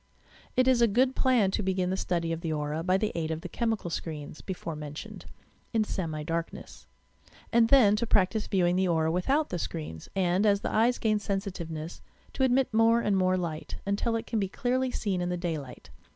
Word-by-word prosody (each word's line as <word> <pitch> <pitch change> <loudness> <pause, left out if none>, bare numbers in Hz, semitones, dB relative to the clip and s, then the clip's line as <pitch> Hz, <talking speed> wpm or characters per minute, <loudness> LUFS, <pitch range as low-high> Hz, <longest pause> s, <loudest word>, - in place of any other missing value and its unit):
It 255 0 +4
is 255 -2 +4
a 235 - +6
good 255 +5 +2
plan 245 -7 +3
to 210 - -1
begin 185 -2 0
the - - 0
study 170 -3 -1
of 165 0 -3
the 165 - -2
aura 150 +1 -2
by 185 +2 +2
the 215 +1 -1
aid 160 -2 -2
of 160 0 -3
the 180 - -6
chemical 220 -2 -2
screens, 150 -2 -5
before 170 -4 -5
mentioned, 150 0 -8 0.5
in 225 -1 +3
semi 160 -7 -3
darkness: 165 +1 -5 0.7
and 230 -1 +5
then 225 -7 +6
to 235 +1 -1
practise 205 +2 +2
viewing 180 -2 +2
the 190 0 +2
aura 160 -2 +2
without 270 - +1
the 175 - -3
screens, 150 - -6
and, 185 0 +2
as 200 -1 +3
the - - -3
eyes 235 +3 +3
gain 215 -2 +1
sensitiveness, 175 -6 -4 0.3
to - - -5
admit 260 -1 +2
more 225 +1 +5
and 205 -3 +1
more 185 -1 +2
light, 165 -3 -4
until 205 +4 0
it 225 - -2
can 225 - -1
be 195 -2 -1
clearly 255 +4 0
seen 195 -7 -2
in 175 - -1
the 180 - -1
daylight. 160 -7 -5
190 Hz, 205 wpm, -28 LUFS, 165-225 Hz, 0.7 s, a